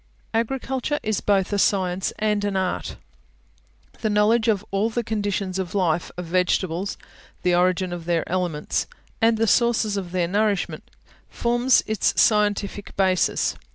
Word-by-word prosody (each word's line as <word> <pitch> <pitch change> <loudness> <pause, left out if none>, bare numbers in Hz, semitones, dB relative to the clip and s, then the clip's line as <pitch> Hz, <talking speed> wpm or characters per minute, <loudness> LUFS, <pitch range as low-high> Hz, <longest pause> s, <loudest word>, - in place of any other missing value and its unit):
Agriculture 265 +4 -1
is 215 -2 -1
both 200 -1 +1
a 200 - +1
science 185 -2 +1
and 210 -1 0
an 200 -1 -1
art. 185 -1 -2 1.0
The 220 - -1
knowledge 215 +2 +3
of 210 -3 +1
all 200 +3 +1
the 235 +1 -2
conditions 205 -3 -2
of 185 -2 -4
the - - 0
life 170 -3 +1
of 180 - -4
vegetables, 180 +1 0 0.5
the 180 - +2
origin 180 0 +2
of 170 -2 -6
their 170 -1 0
elements, 175 -5 -1 0.3
and 225 0 +4
the 225 - +2
sources 225 -2 +2
of 185 -3 -5
their 180 -2 0
nourishment, 205 +1 -1 0.4
forms 240 +2 +2
its 220 -2 0
scientific 205 -2 +1
basis. 185 -2 +2
200 Hz, 150 wpm, -23 LUFS, 180-220 Hz, 1.0 s, and